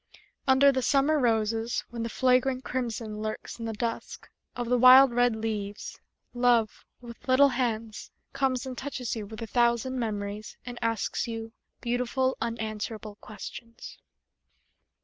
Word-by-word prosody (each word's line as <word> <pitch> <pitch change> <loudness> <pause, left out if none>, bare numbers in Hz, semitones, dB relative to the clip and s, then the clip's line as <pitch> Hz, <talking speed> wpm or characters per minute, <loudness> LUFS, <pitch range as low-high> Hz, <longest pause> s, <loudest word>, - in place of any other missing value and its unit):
Under 270 +1 +6
the 260 -1 -1
summer 285 +4 +3
roses 225 -1 0
When 235 -1 -5
the 230 - -2
flagrant 255 +2 +2
crimson 230 -4 -4
Lurks 215 +2 -5
in 230 - -5
the 225 - -3
dusk 230 +2 -4 0.3
Of 245 -1 -3
the 250 +1 +2
wild 255 +1 +9
red 245 -1 +3
leaves, 215 -2 -4 0.3
Love, 240 -3 +2 0.2
with 235 0 -12
little 270 +2 +6
hands, 230 -4 -3 0.2
Comes 260 -2 0
and 260 -1 -5
touches 255 -3 -4
you 215 -2 -5
With 220 +2 -7
a - - -3
thousand 240 +2 +1
memories, 210 -2 -4
And 245 -1 -7
asks 225 -1 -1
you 225 -1 -5 0.3
Beautiful, 250 +2 0
unanswerable 215 -2 -4
questions. 230 +2 -10
235 Hz, 140 wpm, -28 LUFS, 220-255 Hz, 0.3 s, wild